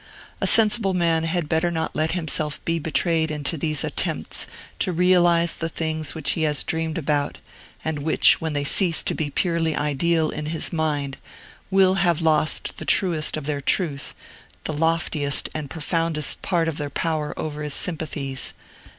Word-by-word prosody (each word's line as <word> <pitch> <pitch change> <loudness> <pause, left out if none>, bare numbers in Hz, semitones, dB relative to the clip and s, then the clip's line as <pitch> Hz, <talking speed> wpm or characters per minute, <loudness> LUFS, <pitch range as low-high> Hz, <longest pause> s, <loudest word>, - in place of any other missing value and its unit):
A - - +2
sensible 215 -3 +4
man 165 -2 +1
had 165 -1 -1
better 160 +2 +1
not 160 -1 -3
let 160 +1 0
himself 155 -3 -1
be 165 0 0
betrayed 160 +1 +1
into 150 +1 -2
these 155 -2 -1
attempts - - -2 0.3
to - - +1
realize 175 -1 +3
the 165 - -3
things 160 -1 -3
which 160 -3 0
he 165 - -1
has 150 -2 +3
dreamed 160 0 -2
about, 145 -2 -1 0.5
and 160 -2 -2
which, 155 +2 +4
when 160 -1 -2
they 145 -1 -1
cease 165 +2 +3
to - - +1
be 155 -2 -2
purely 165 0 0
ideal 155 +2 0
in 150 0 -5
his 160 +2 +1
mind, 145 -4 -2 0.5
will 190 -1 +4
have 175 -4 +2
lost 155 -1 +1
the - - -4
truest 165 -6 +2
of 155 - -6
their 145 -1 -2
truth, 145 -1 0 0.5
the 155 - -3
loftiest 155 -2 +1
and 150 -3 -5
profoundest 160 -1 0
part 170 -3 0
of 160 -2 -3
their 145 -1 -3
power 155 0 -2
over 150 -1 -5
his 150 -1 -1
sympathies. 145 -6 -1
160 Hz, 170 wpm, -23 LUFS, 150-170 Hz, 0.5 s, sensible